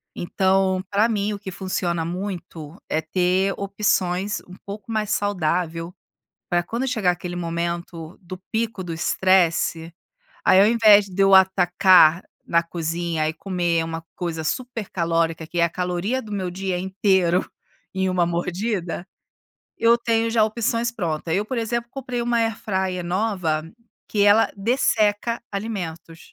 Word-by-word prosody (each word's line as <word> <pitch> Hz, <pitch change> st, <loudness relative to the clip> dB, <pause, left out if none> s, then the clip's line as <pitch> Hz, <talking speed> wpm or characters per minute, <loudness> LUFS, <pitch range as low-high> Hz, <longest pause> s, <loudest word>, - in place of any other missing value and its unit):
Então, 190 Hz, +1 st, +1 dB
para 205 Hz, +3 st, +3 dB
mim, 210 Hz, -2 st, -1 dB
o 205 Hz, -, -6 dB
que 195 Hz, -2 st, -7 dB
funciona 175 Hz, -3 st, -2 dB
muito 175 Hz, -2 st, -6 dB
é 155 Hz, -, +1 dB
ter 185 Hz, +4 st, +1 dB
opções 200 Hz, -1 st, 0 dB
um 180 Hz, -, -11 dB
pouco 200 Hz, +2 st, -8 dB
mais 215 Hz, -2 st, -1 dB
saudável, 175 Hz, -4 st, -1 dB, 0.6 s
para 175 Hz, -1 st, +1 dB
quando 235 Hz, +9 st, -3 dB
chegar 210 Hz, -7 st, +2 dB
aquele 175 Hz, 0 st, -6 dB
momento 170 Hz, -1 st, -4 dB
do 185 Hz, +1 st, -9 dB
pico 220 Hz, -3 st, -2 dB
do 175 Hz, -, -6 dB
estresse. 170 Hz, -1 st, +1 dB, 0.5 s
Aí, 185 Hz, -, +6 dB
ao 200 Hz, -, +6 dB
invés, 215 Hz, -3 st, +6 dB
de 190 Hz, 0 st, -5 dB
eu 195 Hz, 0 st, +6 dB
atacar 185 Hz, -2 st, +5 dB, 0.2 s
na 170 Hz, 0 st, +2 dB
cozinha 165 Hz, -1 st, -2 dB
e -, -, -2 dB
comer 175 Hz, -2 st, -1 dB
uma 165 Hz, 0 st, -5 dB
coisa 165 Hz, -2 st, -4 dB
super 240 Hz, +3 st, -3 dB
calórica, 165 Hz, -2 st, 0 dB
que 170 Hz, +2 st, -6 dB
é 170 Hz, -, +5 dB
a 170 Hz, -, +2 dB
caloria 180 Hz, +8 st, -2 dB
do 215 Hz, -, -11 dB
meu 190 Hz, -3 st, -3 dB
dia 190 Hz, -1 st, -2 dB
inteiro 190 Hz, -1 st, +1 dB, 0.5 s
em 190 Hz, 0 st, 0 dB
uma 180 Hz, -2 st, +2 dB
mordida, 175 Hz, +1 st, -2 dB, 0.7 s
eu 230 Hz, +1 st, +4 dB
tenho 230 Hz, -1 st, +1 dB
já 225 Hz, -2 st, +4 dB
opções 230 Hz, +1 st, 0 dB
pronta. 165 Hz, -7 st, -3 dB
Eu, 200 Hz, +4 st, +1 dB
por 250 Hz, +3 st, -4 dB
exemplo, 235 Hz, +1 st, -2 dB
comprei 255 Hz, -3 st, -4 dB
uma 235 Hz, 0 st, +1 dB
Air 225 Hz, -1 st, +1 dB
Fryer 190 Hz, -5 st, -2 dB
nova, 175 Hz, -4 st, -1 dB, 0.4 s
que 205 Hz, -, 0 dB
ela 205 Hz, +2 st, +5 dB
desseca 220 Hz, 0 st, +1 dB
alimentos. 180 Hz, -6 st, -5 dB
185 Hz, 150 wpm, -23 LUFS, 170-210 Hz, 0.7 s, Aí